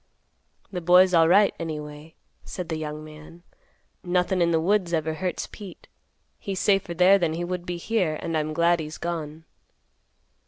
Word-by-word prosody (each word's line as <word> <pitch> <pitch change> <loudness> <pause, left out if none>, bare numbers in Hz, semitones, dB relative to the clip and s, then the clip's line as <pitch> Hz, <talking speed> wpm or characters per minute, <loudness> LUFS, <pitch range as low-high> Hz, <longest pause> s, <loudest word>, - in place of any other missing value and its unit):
"The 180 -2 -4
boy's 180 +2 +5
alright, 175 +5 +5
anyway," 150 -1 -7 0.3
said 180 -2 -7
the 160 - -2
young 155 0 -6
man; 155 +2 -13 0.6
"nothin' 180 +1 0
in 170 - +3
the 165 -1 +2
woods 180 0 +1
ever 160 -1 0
hurts 180 +3 -3
Pete. 200 -4 -11 0.5
He's 195 -3 -4
safer 195 -4 +1
there 185 +3 +5
than 170 -3 0
he 175 - -3
would 180 0 -5
be 175 -1 -3
here, 180 -5 -1
and 165 - -4
I'm 155 0 -1
glad 170 +2 +2
he's 155 0 -6
gone." 160 -2 -5
170 Hz, 160 wpm, -25 LUFS, 160-180 Hz, 0.6 s, boy's